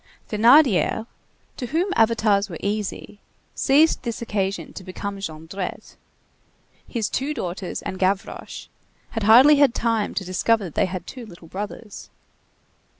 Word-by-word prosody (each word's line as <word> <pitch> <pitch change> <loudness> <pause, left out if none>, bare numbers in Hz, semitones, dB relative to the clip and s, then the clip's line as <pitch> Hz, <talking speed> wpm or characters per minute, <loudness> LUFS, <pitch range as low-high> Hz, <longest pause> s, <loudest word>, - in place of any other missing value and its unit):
Thénardier, 225 - +4 0.5
to 250 - -4
whom 350 +8 0
avatars 215 -3 +2
were 170 - -6
easy, 205 0 -4 0.3
seized 300 +4 +3
this 235 -3 -4
occasion 200 -4 -3
to 190 - -9
become 200 +2 -6
Jondrette. 170 +1 -6 0.9
His 225 -4 -2
two 290 +3 -2
daughters 185 -4 -5
and 185 - -5
Gavroche 190 +1 -2 0.5
had 225 - -3
hardly 250 +8 +7
had 280 -5 +4
time 230 -3 0
to 195 - -2
discover 205 +4 +1
that 170 -5 -7
they - - +1
had 185 -1 -6
two 250 -4 -9
little 175 -4 -14
brothers. 205 +3 -7
210 Hz, 135 wpm, -23 LUFS, 190-235 Hz, 0.9 s, hardly